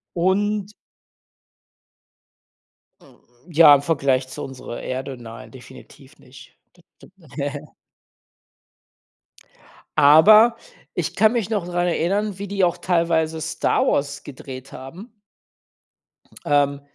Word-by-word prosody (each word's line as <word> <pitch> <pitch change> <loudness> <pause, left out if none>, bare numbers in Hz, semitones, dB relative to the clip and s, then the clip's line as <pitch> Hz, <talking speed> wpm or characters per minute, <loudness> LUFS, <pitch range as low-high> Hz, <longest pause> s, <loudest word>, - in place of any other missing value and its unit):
Und 200 +3 0 2.3
Hm, - - -21 0.3
ja, 160 -2 +7
im 140 - +4
Vergleich 140 -4 0
zu 130 - -8
unserer 130 -3 -8
Erde, 130 +1 -5
nein, 115 -1 -11
definitiv 130 +1 -16
nicht 130 +1 -17 0.2
d 175 - -24 0.2
d - - -17 0.3
ne. 145 +1 -5 2.3
Aber 210 +11 +7 0.4
ich - - -4
kann 220 +1 +3
mich 230 -4 -2
noch 205 -6 -2
dran 175 0 -1
erinnern, 195 +4 -1
wie 200 - -5
die 195 0 -1
auch 175 0 +1
teilweise 165 -2 0
Star 160 - 0
Wars 140 0 -1
gedreht 130 -1 -10
haben. 165 - -11 1.3
Ähm, 140 -1 +1
160 Hz, 105 wpm, -21 LUFS, 135-190 Hz, 2.3 s, ja